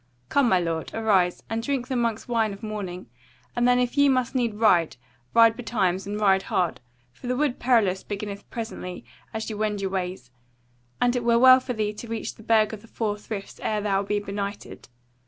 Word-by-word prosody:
Come, 280 -4 +3
my 185 - +4
lord, 165 -2 -2
arise, 195 -6 +2
and 225 0 -2
drink 255 0 -2
the 260 - -2
monk's 230 -2 -1
wine 225 -3 +1
of 200 - -12
morning, 200 -4 -5 0.5
and 240 0 +2
then 250 0 +5
if 250 0 0
ye 285 -1 +5
must 255 -2 +1
need 240 -5 0
ride, 180 - +3 0.4
ride 230 -1 +7
betimes, 200 -6 -1
and 205 +1 -3
ride 195 -2 +4
hard; 180 -7 -1 0.3
for 245 - -10
the 250 - 0
Wood 285 -3 0
Perilous 220 -7 +2
beginneth 200 -1 -6
presently 220 -6 -6 0.3
as 220 0 -4
ye 220 - -4
wend 210 -1 -1
your 195 -1 -2
ways; 180 -9 -4 0.7
and 245 0 +2
it 245 - -1
were 235 0 +4
well 255 +1 +8
for 255 -1 -4
thee 215 -2 -1
to 225 +3 -9
reach 225 -1 -4
the - - -16
Burg 220 -1 +3
of 210 - -7
the 230 - -16
Four 215 -2 -2
Friths 210 -1 -7
ere 215 -1 0
thou 200 -1 +1
be 205 +1 -1
benighted. 200 - -6
215 Hz, 205 wpm, -25 LUFS, 195-235 Hz, 0.7 s, well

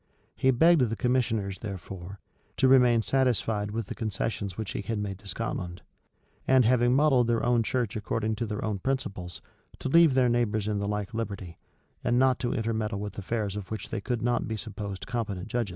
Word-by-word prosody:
[] - - -37
He 130 - +2
begged 160 +5 +5
the 115 - -2
commissioners, 115 -6 0
therefore, 95 -2 -7 0.4
to 130 - +4
remain 125 -3 +5
satisfied 115 -6 +1
with 110 +1 -3
the - - -6
concessions 105 -3 -3
which 110 -3 -4
he - - -3
had 110 +2 -3
made 100 -2 -4
to 100 - -15
Scotland; 95 -3 -4 0.6
and 130 -2 +5
having 120 +1 +4
modelled 135 -4 +4
their 115 0 +1
own 120 -1 +3
church 120 -1 -1
according 110 +1 -1
to 115 - -2
their 105 +1 -3
own 105 -3 -2
principles, 95 -9 -3 0.3
to - - -4
leave 165 -2 +6
their 130 -1 +4
neighbors 110 -3 +1
in 105 -1 0
the 100 - -2
like 105 +1 -3
liberty, 100 -6 -5 0.4
and 120 - +2
not 130 0 +4
to 120 - -1
intermeddle 110 -2 -1
with 105 -1 -5
affairs 105 0 -2
of 100 -3 -6
which 110 -2 -5
they 110 - -3
could 120 +1 -2
not 120 0 +1
be 110 0 -3
supposed 100 -3 -6
competent 110 -5 -3
judges. 120 -3 -1
110 Hz, 200 wpm, -28 LUFS, 100-120 Hz, 0.6 s, leave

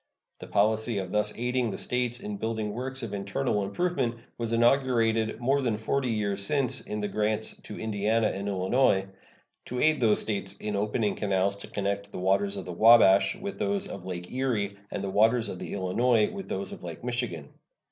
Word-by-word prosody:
The - - -9
policy 110 +2 +2
of 95 -2 -3
thus 105 0 +1
aiding 125 0 0
the - - -4
States 125 -1 -1
in 105 -1 -5
building 110 -1 -2
works 130 +2 -4
of 110 -3 -5
internal 100 +2 -1
improvement 130 - -1 0.2
was 115 -1 -3
inaugurated 115 -2 +2
more 135 +3 +2
than 115 -5 0
forty 130 +4 -1
years 100 -3 -1
since 135 +3 +1
in 105 - -5
the 105 - -1
grants 105 +1 -1
to 105 - -9
Indiana 110 +1 +1
and 100 +1 -4
Illinois, 95 +1 +2 0.6
to 125 - -4
aid 155 +1 +3
those 110 -3 +4
States 100 -2 -2
in 105 +1 -4
opening 105 +1 0
canals 100 -1 0
to 100 - -10
connect 100 0 -3
the - - -7
waters 100 +2 +1
of 95 - -6
the 90 - -6
Wabash 100 -2 +6
with 200 +1 -6
those 200 -2 0
of 95 - -8
Lake 90 -1 -6
Erie 115 -6 -1
and 100 - -4
the 100 - -2
waters 115 +3 +3
of 90 - -6
the - - -6
Illinois 105 +4 +2
with 195 -2 -7
those 95 +1 -3
of - - -9
Lake 85 +2 -7
Michigan. 120 - -3
110 Hz, 190 wpm, -28 LUFS, 100-120 Hz, 0.6 s, Wabash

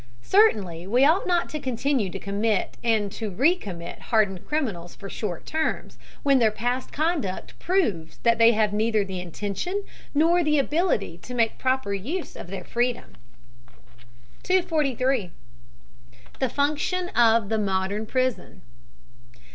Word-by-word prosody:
Certainly 190 - +3
we 245 +6 +4
ought 335 +7 +3
not 350 -1 +2
to 305 - -4
continue 260 -4 0
to - - -5
commit 200 0 -1
and 220 -4 +1
to 220 +1 -4
re 270 - +3
commit 175 - -8
hardened 205 -5 +1
criminals 215 - -2
for 195 -1 -9
short 185 -7 -4
terms, 315 0 -2 0.2
when 275 -2 +4
their 225 -2 +4
past 245 +4 -2
conduct 300 - -2
proves 210 - 0
that 235 -1 +3
they 230 +1 +7
have 210 -1 +1
neither 215 -1 +1
the 190 -1 -5
intention 205 - -3 0.3
nor 335 +4 +4
the 300 -1 +2
ability 280 - 0
to 250 +7 -8
make 230 -2 +1
proper 260 -5 0
use 280 - -4
of - - -8
their 195 +2 -6
freedom. 240 0 -2 1.3
243. 275 - +1 1.1
THE 260 - +1
FUNCTION 300 +7 0
OF 230 - +3
THE 220 -1 +1
MODERN 200 +1 -1
PRISON. 255 - -2
235 Hz, 140 wpm, -25 LUFS, 200-295 Hz, 1.3 s, they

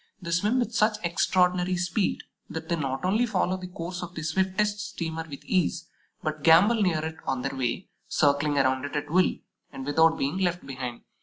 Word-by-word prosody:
They 170 -3 -6
swim 205 +9 +2
with 240 -2 0
such 215 -1 +2
extraordinary 180 +1 +2
speed 180 +3 0 0.3
that 160 0 -6
they 170 - +2
not 135 -2 -3
only 215 +6 +2
follow 185 -3 0
the 185 -1 -7
course 180 0 -6
of 175 0 -7
the 160 - -5
swiftest 190 +5 0
steamer 165 -5 -4
with 140 - -9
ease, 170 -3 0 0.4
but 155 -1 -3
gambol 200 +8 +6
near 160 -5 +1
it 160 0 -5
on 130 -1 -1
their - - -3
way, 130 +7 -2 0.2
circling 145 0 +2
around 130 -1 +2
it 145 +1 -5
at 150 0 -3
will, 185 +2 +3 0.4
and 135 - -7
without 160 +3 +4
being 145 +7 -1
left 175 -2 0
behind. 125 -3 -6
170 Hz, 190 wpm, -27 LUFS, 150-185 Hz, 0.4 s, gambol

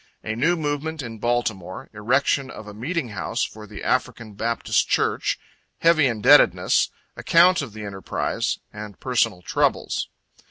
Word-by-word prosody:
A 110 - -3
New 160 +9 +2
Movement 150 0 -3
in 115 -2 -8
Baltimore 110 -6 -2
Erection 130 +5 +1
of 110 - -9
a 105 - -8
Meeting 135 - -3
House 100 -3 -2
for 105 0 -7
the 105 0 -9
African 110 -2 -1
Baptist 115 +3 0
Church - - +1 0.4
Heavy 165 -4 +5
Indebtedness 110 -4 +4 0.3
Account 175 +1 +4
of 130 -7 -7
the 110 -1 -7
Enterprise 95 -1 -2 0.4
Personal 115 -7 0
Troubles. - - 0
115 Hz, 130 wpm, -23 LUFS, 105-145 Hz, 0.4 s, Heavy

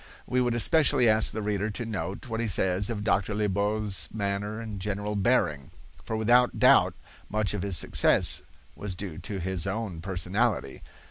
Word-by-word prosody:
We 125 0 0
would 120 -1 0
especially 140 0 +4
ask 110 0 +5
the 110 - -5
reader 105 0 -1
to 115 +3 -4
note 105 0 -5
what 115 -2 -4
he 115 - -1
says 95 0 +1
of 105 -3 -4
Dr. 105 -1 0
Liebault's 105 0 0
manner 100 +1 -3
and 110 -3 -6
general 105 +1 -3
bearing, 85 - 0 0.3
for 110 - -3
without 120 +3 +3
doubt - - +5 0.3
much 105 -1 -1
of 105 - -3
his 100 -3 0
success - - +3 0.3
was 100 -3 -5
due 90 -4 -7
to 95 +2 -5
his 95 0 -2
own 95 -4 -4
personality. 95 - -2
105 Hz, 170 wpm, -27 LUFS, 95-110 Hz, 0.3 s, ask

